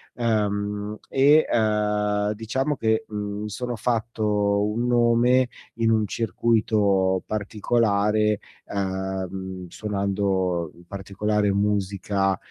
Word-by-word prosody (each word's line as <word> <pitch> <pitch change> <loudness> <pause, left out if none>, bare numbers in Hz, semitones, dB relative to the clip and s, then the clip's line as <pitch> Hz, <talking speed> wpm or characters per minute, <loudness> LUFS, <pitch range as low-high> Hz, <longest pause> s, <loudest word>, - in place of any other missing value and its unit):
ehm, 105 -2 -1
e, 145 +3 +5
ehm, 105 -1 +1
diciamo 130 +7 -2
che, 110 -2 0
mhmm, 105 -1 -4
mi 105 - -4
sono 125 +3 -4
fatto 105 -3 0
un 115 +3 -1
nome 120 +1 +4 0.3
in 115 -1 +2
un 110 -1 +2
circuito 105 -3 +1
particolare, 105 0 +1 0.3
ehm, 95 -1 -4
suonando 95 -4 -1 0.2
particolare 100 +2 -1
musica, 100 -1 0
105 Hz, 90 wpm, -24 LUFS, 100-110 Hz, 0.3 s, e